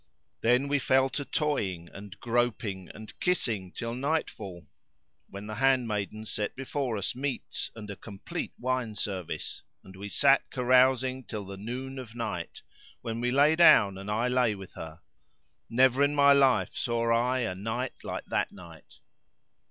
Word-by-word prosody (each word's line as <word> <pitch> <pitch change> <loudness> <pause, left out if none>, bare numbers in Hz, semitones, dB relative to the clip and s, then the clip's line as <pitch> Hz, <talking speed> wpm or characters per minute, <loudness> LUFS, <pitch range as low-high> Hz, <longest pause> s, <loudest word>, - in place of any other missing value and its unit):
Then 125 +4 +3
we 145 0 +2
fell 130 0 +3
to 145 - -3
toying 100 - -1
and 100 0 -11
groping 115 -6 -1
and 110 0 -11
kissing 110 - 0
till 115 +2 -4
night 145 +6 0
fall, 95 -6 -9 0.6
when 100 +1 -8
the 110 - -6
handmaidens 110 -5 0
set 105 -1 -2
before 135 -3 -2
us 100 - -2
meats 135 +1 -3
and 110 -2 -8
a - - -6
complete 100 -2 -6
wine 125 -3 -2
service, 95 -5 -4 0.2
and 95 - -13
we 100 +2 -7
sat - - +4
carousing 130 +1 +3
till 105 -3 -5
the 100 +1 -7
noon 130 +6 -5
of 120 -3 -9
night, 105 -8 -4 0.4
when 115 0 -4
we 125 - +1
lay 145 +5 +5
down 105 - +7
and 100 +1 -7
I 110 +4 +1
lay 125 -4 +2
with 95 -1 -11
her; 80 +1 -9 0.7
never 130 +2 +4
in 145 +1 +3
my 140 0 +7
life 135 -2 +3
saw 115 -1 0
I 125 +2 +2
a 115 -6 -1
night 115 +7 -3
like - - -5
that - - -1
night. 85 -4 -14
115 Hz, 160 wpm, -29 LUFS, 100-130 Hz, 0.7 s, down